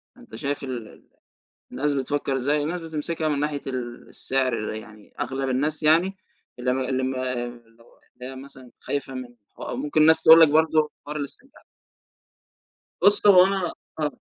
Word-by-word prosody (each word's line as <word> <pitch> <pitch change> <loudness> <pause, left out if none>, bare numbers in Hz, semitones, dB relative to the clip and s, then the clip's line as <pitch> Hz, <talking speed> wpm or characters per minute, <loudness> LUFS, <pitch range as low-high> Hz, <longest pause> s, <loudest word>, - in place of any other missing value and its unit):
فأنت - - -13
شايف 140 +4 -3
ال 125 -4 -5
ال - - -18 0.6
الناس 145 +1 -1
بتفكر 140 0 -1
إزاي؟ 145 +3 +1
الناس 170 +4 -3
بتمسكها 160 0 -3
من 145 -2 0
ناحية 145 -1 -2
ال 120 -2 -5
السعر 130 -5 -1
يعني 110 -1 -11
أغلب 135 0 -2
الناس 145 +4 -1
يعني 170 +5 +3 0.4
اللي 125 +1 0
م 130 - -1
اللي 130 0 -1
م 130 +1 -1
اللي 120 -2 -5
هو 115 - -24
اللي 125 +1 -9
هي - - -10
مثلًا 130 -2 -12
خايفة 140 -2 -4
من 130 -1 -6 0.3
ح - - -19
أو - - -5
ممكن 145 +4 0
الناس 160 +1 +5
تقول 160 +1 +9
لَك 160 - +8
برضه 155 0 +3 0.2
حوار 150 +1 -5
الاسترجاع 150 - -9 1.4
بُص 205 +1 +4
هو 185 -3 +8
أنا 190 -3 -1 0.3
آه. 150 -1 0
140 Hz, 175 wpm, -24 LUFS, 125-155 Hz, 1.4 s, تقول